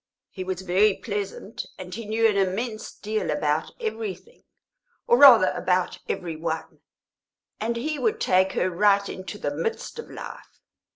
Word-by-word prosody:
He 190 - -5
was 185 0 -4
very 190 +3 +3
pleasant, 205 -1 -5
and 185 -1 -8
he 230 0 -6
knew 225 +1 +3
an 210 - +1
immense 210 +4 -1
deal 215 +1 -3
about 150 0 0
everything, 220 - -5 0.6
or, - - +5
rather, 245 -9 +9
about 180 -1 0
every 170 -3 -3
one, 160 0 -4 0.8
and 230 +2 -1
he 300 +6 -2
would 440 -1 0
take 190 +1 +3
her 185 - 0
right 200 +2 +3
into 190 +2 -7
the 145 -7 -3
midst 165 - -3
of 465 - -8
life. - - -10
200 Hz, 155 wpm, -25 LUFS, 185-225 Hz, 0.8 s, rather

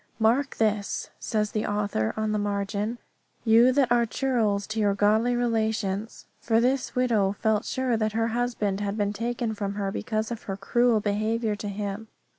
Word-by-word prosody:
"Mark 240 +5 +2
this," 210 -2 -1
says 210 -1 -1
the 215 - -1
author 205 - 0
on 215 0 0
the 210 - 0
margin, 205 +2 -2 0.5
"you 230 +3 +6
that 255 -2 +2
are 235 -1 +4
churls 220 -6 0
to 220 +1 -4
your 205 -2 +2
godly 220 +4 +3
relations." 220 -3 -1
For 225 -1 +2
this 255 +2 0
widow 225 -6 +2
felt 215 0 0
sure 260 -2 0
that 215 -1 0
her 225 +1 +1
husband 230 -4 -1
had 205 0 -2
been 205 -1 0
taken 235 +1 -2
from 200 -2 -3
her 200 -1 -2
because 220 +2 -2
of 235 - -4
her 195 - -2
cruel 235 +2 +2
behaviour 215 +2 0
to 205 - -5
him. 205 +1 -4
220 Hz, 175 wpm, -26 LUFS, 205-235 Hz, 0.5 s, you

